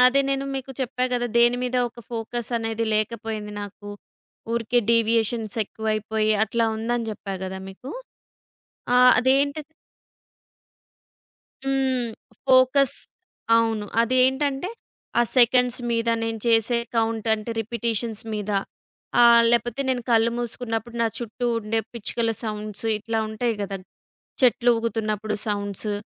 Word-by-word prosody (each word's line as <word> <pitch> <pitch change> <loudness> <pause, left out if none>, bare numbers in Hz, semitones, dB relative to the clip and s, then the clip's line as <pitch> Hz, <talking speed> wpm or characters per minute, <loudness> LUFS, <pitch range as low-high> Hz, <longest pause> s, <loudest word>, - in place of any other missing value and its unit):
అదే 275 +2 +4
నేను 275 0 0
మీకు 270 0 -5
చెప్పా 255 0 -1
గదా! 245 0 +1
దేని 240 +1 +5
మీద 250 0 -1
ఒక 235 - -14
ఫోకస్ 230 0 -4
అనేది 225 0 -2
లేకపోయింది 215 -1 -2
నాకు. 205 0 -9 0.6
ఊరికే 235 +1 +1
డీవియేషన్స్ 230 -1 +2
ఎక్కువైపోయి 215 0 -1
అట్లా 230 +2 0
ఉందని 235 +1 -1
చెప్పా 200 -2 -6
కదా 190 0 -5
మీకు. 195 +7 -9 1.1
ఆ! - - +7 0.2
అదేంటది 280 +4 +2 2.0
హ్మ్. 265 -3 0 0.4
ఫోకస్ 260 +1 +5 0.6
అవును. 225 -2 +1 0.2
అదేంటంటే 265 +5 +2 0.5
ఆ - - +6
సెకండ్స్ 250 0 +4
మీద 230 0 0
నేను 225 0 -2
చేసే 230 +1 +3 0.2
కౌంట్ 225 0 0
అంటే 215 +1 -6
రిపిటీషన్స్ 230 0 -2
మీద 210 0 -3 0.7
ఆహ్, 235 -1 +8
లేపోతే 240 +2 +1
నేను 255 -2 0
కళ్ళు 230 0 +4
మూసుకున్నప్పుడు 235 -1 -4
నా 230 - +3
చుట్టూ 240 +1 -4
ఉండే 225 0 -1
పిచ్చుకల 230 0 -2
సౌండ్స్ 215 -1 -5
ఇట్లా 225 +2 -2
ఉంటాయి 225 +2 -1
గదా! 200 -1 -3 0.6
చెట్లు 245 -1 +4
ఊగుతున్నప్పుడు 215 -2 -2
సౌండ్స్, 205 0 -2
230 Hz, 115 wpm, -24 LUFS, 220-245 Hz, 2.0 s, ఆహ్